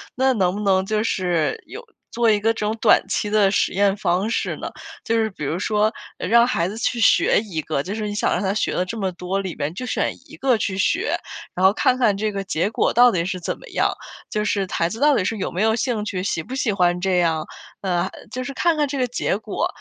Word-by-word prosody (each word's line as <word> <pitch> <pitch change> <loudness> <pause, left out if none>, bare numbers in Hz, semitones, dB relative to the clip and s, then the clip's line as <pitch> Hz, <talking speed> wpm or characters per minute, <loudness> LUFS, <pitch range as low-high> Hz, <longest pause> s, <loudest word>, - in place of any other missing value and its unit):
那 265 +1 +3
能 185 -5 +1
不 - - -4
能 190 -2 +3
就 215 0 0
是 180 - 0
有 485 - -9 0.3
做 230 -1 +3
一 210 - +2
个 225 +2 +2
这 - - -9
种 215 - 0
短 - - +5
期 210 - -1
的 205 -2 +3
实 - - +1
验 200 +1 +2
方 195 0 0
式 - - -1
呢？ - - -6 0.3
就 230 - 0
是 220 -1 +1
比 150 - -8
如 160 +5 -2
说 210 +1 +1 0.3
让 235 +1 +4
孩 175 -9 0
子 215 - -7
去 235 +1 -1
学 210 - +4
一 185 -8 -4
个， 140 -2 -2
就 190 +5 -5
是 215 -1 -3
你 205 - -4
想 - - +1
让 180 - 0
他 195 0 0
学 215 - -1
了 180 - 0
这 225 +5 -6
么 195 -3 -1
多， 180 +2 -3
里 190 -3 -4
面 145 +2 -3
就 255 +8 -5
选 - - -1
一 - - -13
个 260 -3 +2
去 190 -3 -2
学。 195 - +1 0.4
然 185 +1 +1
后 190 - +6
看 250 +3 +2
看 225 -6 +3
这 210 +1 -1
个 195 -1 -3
结 185 0 -1
果 - - +1
到 245 +1 +6
底 170 -4 0
是 185 0 -3
怎 - - -3
么 - - -13
样， - - +2 0.4
就 210 0 -1
是 200 -2 0
孩 165 - +1
子 220 +6 -6
到 290 -1 +5
底 185 - +1
是 220 +3 -1
有 - - -3
没 180 - -2
有 220 0 +3
兴 230 -3 -1
趣， 185 -3 -3
喜 185 -4 -1
不 255 +10 -7
喜 250 -5 0
欢 180 -2 +1
这 185 -1 +1
样？ 165 -3 +1 0.4
呃， 180 -1 0 0.2
就 255 0 -4
是 275 - -5
看 335 +3 +1
看 295 -1 +2
这 280 - -4
个 255 - +2
结 235 -4 -1
果， 220 - -2
205 Hz, 280 characters per minute, -22 LUFS, 185-230 Hz, 0.4 s, 后